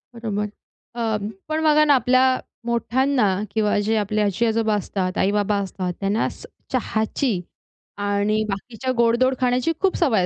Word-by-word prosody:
बरोबर. 210 -3 -2 0.5
अ, 225 -2 0 0.3
पण 315 0 -1
बघा 305 -1 +5
ना 295 - +5
आपल्या 255 0 +3 0.3
मोठ्यांना 245 +2 +1 0.3
किंवा 210 -1 +1
जे 225 - +2
आपले 210 0 0
आजी-आजोबा 220 +2 +1
असतात, 190 -2 -2
आई-बाबा 205 +1 +1
असतात 185 -2 -4
त्यांना 200 +2 0 0.4
चहाची 220 -3 -1 0.6
आणि 205 +1 0
बाकीच्या 225 +5 -3
गोडदोड 235 +3 +3
खाण्याची 250 +4 +1
खूप 385 -1 +2
सवय 225 - +2
225 Hz, 130 wpm, -22 LUFS, 205-255 Hz, 0.6 s, बघा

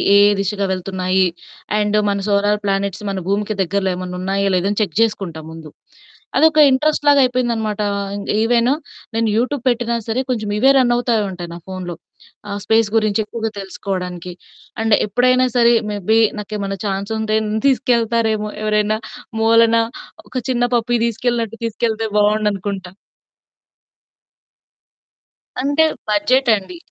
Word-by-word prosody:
ఏ - - +8 0.2
దిశగా 200 0 -1
వెళ్తున్నాయి, 185 0 0 0.5
అండ్ 210 0 +1
మన 200 - 0
సోలార్ 205 +1 +2
ప్లానెట్స్ 195 0 -1
మన 195 -1 -2
భూమికి 210 +1 -1
దగ్గరలో 190 +1 -1
ఏమన్నా 180 0 -6
ఉన్నాయా? 195 +1 0
లేదా? 180 +2 +1
అని 205 - -2
చెక్ 170 -5 -6
జేసుకుంటా 195 -8 -1
ముందు. 160 -2 -10 0.7
అదొక 315 -1 +5
ఇంట్రెస్ట్‌లాగా 290 +1 +3
అయిపోయిందనమాట. 235 -4 -1 0.6
ఈవెన్ 235 +2 +3 0.4
నేను 225 0 +1
యూట్యూబ్ 255 +2 0
పెట్టినా 235 0 0
సరే 235 +4 0
కొంచెం 215 -4 -2
ఇవే 270 +5 +5
రన్ 245 -2 +3
అవుతా 240 -1 0 0.2
ఉంటాయి 175 -2 -7
నా - - -7
ఫోనులో. 185 -2 -6 0.5
ఆహ్, 200 0 -4
స్పేస్ 225 -1 +3
గురించి 215 0 +1
ఎక్కువగా 225 -1 -4
తెలుసుకోవడానికి 180 -2 -5 0.5
అండ్ 220 -2 +4
ఎప్పుడైనా 255 +4 +3
సరే 235 0 +5 0.2
మే 205 - -3
బీ 225 - +5 0.2
నాకేమన్నా 200 -1 -4
ఛాన్సుంటే 215 +2 -1
నన్ను 215 +1 -2
తీసుకెళ్తారేమో! 230 -4 +1
ఎవరైనా 210 0 +1 0.4
మూలన 230 0 +5 0.5
ఒక - - -18
చిన్న 245 -1 +1
పప్పీ 240 +1 +1
దీసుకెళ్ళినట్టు 230 -1 -2
తీసుకెళ్తే 225 0 -1
బావుండనుకుంటా. 205 -3 0 2.7
అంటే 285 +4 +2 0.3
బడ్జెట్ 250 +5 +2
అండి. 210 - -7
215 Hz, 125 wpm, -19 LUFS, 195-235 Hz, 2.7 s, ఏ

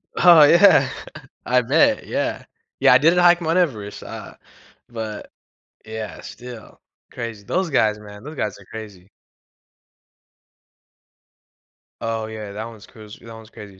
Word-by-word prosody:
Oh 170 -4 +7
yeah, 175 +7 +6 0.6
I 125 0 +3
bet, 140 +7 +2
yeah. - - -3 0.3
Yeah, - - +6
I - - +8
didn't 165 +5 +3
hike 175 0 +5
Mount 165 +2 0
Everest, 110 - -2
uh, - - -9 0.5
but 110 -3 -7 0.5
yeah, 110 -1 -7
still 125 -2 -11 0.3
crazy, 115 -3 -7
those 180 - -1
guys, 105 -6 +2
man, 105 -1 -13
those 150 +1 -9
guys 105 -6 -3
are 100 - -16
crazy. 105 -4 -10 2.9
Oh 115 -1 -3
yeah, 110 -2 -8
that 110 +2 -6
one's 115 -2 -12
cruz 110 -3 -14
that 115 0 -12
one's 110 0 -13
crazy 100 -4 -13
115 Hz, 135 wpm, -21 LUFS, 105-150 Hz, 2.9 s, I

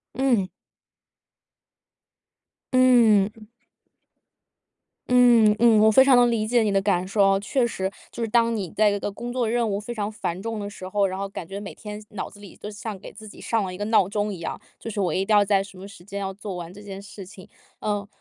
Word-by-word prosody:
嗯。 240 -8 +1 2.2
嗯。 225 -4 +4 1.6
嗯 235 -4 +6
嗯， 225 -2 +5
我 220 - +6
非 265 +5 +6
常 270 - +6
能 245 -1 +5
理 225 -2 0
解 235 +1 +2
你 215 - +1
的 195 - +3
感 185 -3 +1
受 200 +1 +2
啊。 195 0 +3
确 245 +5 0
实， 190 -5 -2 0.2
就 - - -7
是 225 - -1
当 230 0 +2
你 195 -5 -3
在 210 +4 +3
一 205 - -2
个 205 - -3
工 240 +4 -6
作 245 -3 0
任 235 -1 +1
务 200 -1 -1
非 215 - -7
常 215 -2 -3
繁 180 -4 -4
重 225 +2 -4
的 205 0 -5
时 185 -2 -9
候， 200 +1 +1
然 190 0 -5
后 200 - -3
感 185 -3 -8
觉 195 +2 -6
每 200 -1 -8
天 210 0 -8
脑 210 - -6
子 205 - -16
里， 205 -2 -13
都 210 - -8
像 210 0 -6
给 - - -10
自 220 - -12
己 210 - -13
上 225 -2 0
了 185 -1 -5
一 - - -8
个 205 - -3
闹 215 -4 +3
钟 205 +1 -2
一 185 - -7
样， - - -5 0.2
就 - - -10
是 210 -2 -3
我 185 - 0
一 190 - 0
定 210 +1 +3
要 205 - +6
在 195 -1 +2
什 195 -2 -13
么 195 - -9
时 200 -3 -14
间， 200 +2 -6
要 195 -1 -3
做 200 0 -7
完 170 -1 -7
这 205 +3 -13
件 195 -1 -8
事 200 -1 -10
情。 185 -1 -14 0.3
呃， 205 -1 -2
205 Hz, 250 characters per minute, -24 LUFS, 195-225 Hz, 2.2 s, 嗯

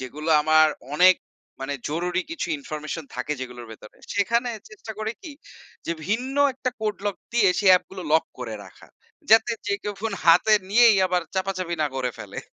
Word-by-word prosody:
যেগুলো 150 +5 -6
আমার 155 0 +5 0.3
অনেক, 185 +4 +7 0.5
মানে 135 +1 -3
জরুরি 175 +4 -1
কিছু 330 - -3
ইনফরমেশন 150 +2 -6
থাকে 130 +4 -2
যেগুলোর 125 -2 -7
ভেতরে। 105 -1 -14 0.2
সেখানে 235 +5 +1 0.2
চেষ্টা 385 - -9
করি 220 +1 -2
কি? 325 -6 -8 0.5
যে, 170 - 0
ভিন্ন 245 +6 -2 0.2
একটা 255 0 -3
কোড 215 -1 -1
লক 200 - -2 0.2
দিয়ে, 225 -5 +4
সে 205 - -2
অ্যাপ 180 -1 +6
গুলো 190 -1 -7
লক 160 +1 +4
করে 120 -3 -5
রাখা। - - -17 0.4
যাতে 225 +2 +6
যে 205 - 0
কেউ 205 - -4
ফোন 225 0 -2
হাতে 175 +6 +6 0.2
নিয়েই 230 0 +6
আবার 180 -1 0
চাপাচাপি 185 -2 -2
না - - +2
করে 125 -1 -1
ফেলে। - - -8
185 Hz, 175 wpm, -24 LUFS, 150-220 Hz, 0.5 s, অনেক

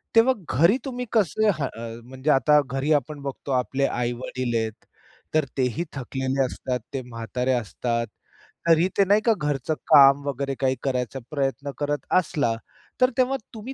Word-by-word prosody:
तेव्हा 235 +3 +6 0.2
घरी 170 - +5
तुम्ही 250 -2 -4
कसं 215 0 +2
हं 135 - 0
अ, 115 0 -8
म्हणजे 130 +4 -4
आता 150 +3 +5
घरी 135 +3 -2
आपण 145 +1 -1
बघतो 140 0 -6
आपले 130 +2 +1
आई-वडील 120 0 -2
आहेत. 110 0 -4 0.5
तर 155 -2 +3
तेही 130 +5 0
थकलेले 135 0 -1
असतात, 125 0 -3
ते 135 - -2
म्हातारे 125 +1 -3
असतात. 115 0 -2 0.6
तरीही 165 +2 +5
ते 200 - +6
नाही 205 +3 +4
का 230 - +5
घरचं 145 0 -1 0.2
काम 140 0 +7
वगैरे 140 0 -2
काही 130 -1 +2
करायचा 130 -1 -2
प्रयत्न 140 0 -2
करत 145 0 -2
असला, 145 -8 0 0.5
तर 255 - +6
तेव्हा 260 +1 +2 0.2
तुम्ही 230 +4 -7
135 Hz, 155 wpm, -24 LUFS, 125-155 Hz, 0.6 s, काम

